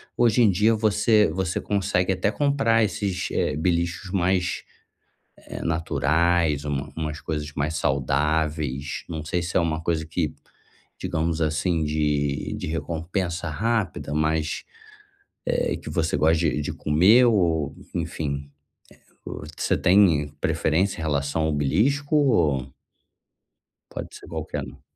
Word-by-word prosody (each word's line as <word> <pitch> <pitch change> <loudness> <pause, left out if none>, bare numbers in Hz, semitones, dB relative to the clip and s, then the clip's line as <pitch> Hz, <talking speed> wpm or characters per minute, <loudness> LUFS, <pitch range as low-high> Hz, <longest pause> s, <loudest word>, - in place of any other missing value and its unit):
hoje 120 0 +3
em 115 - +6
dia 105 +4 +3
você 110 -1 +3
você 90 0 -1
consegue 95 -2 0
até 95 +2 0
comprar 135 -4 +2
esses, 100 -3 -2
eh, 75 - 0
beliscos 85 +2 -1
mais, 90 -1 0 0.7
eh, - - -9
naturais, 80 0 +1
uma 70 -1 -3
umas 75 -1 -4
coisas 75 -2 -4
mais 75 +2 -2
saudáveis. 75 0 0
Não 80 -3 -4
sei 90 +3 -1
se 85 - -1
é - - +5
uma 80 -2 -1
coisa 80 -2 0
que, 80 - -2 0.7
digamos 80 +1 -1
assim, 80 +1 0
de 75 -2 0
de - - -5
recompensa 85 +2 -3
rápida, 105 -2 -1
mas, 80 0 0 0.8
eh, - - 0
que - - -9
você 80 -3 0
gosta 80 +2 +3
de 75 -3 +1
de - - -3
comer 95 +12 +5
ou 85 - +2 0.2
enfim, 70 -1 -3 0.6
eh, - - -30
o - - -6
você - - +1
tem 90 -6 +4
preferência 85 +6 +1
em - - -4
relação 70 0 -1
ao 80 - +1
belisco? 135 - +1
Ou 80 - +2 1.2
Pode - - -7
ser - - -12
qualquer - - -4
um. - - -13
80 Hz, 135 wpm, -24 LUFS, 75-95 Hz, 1.2 s, em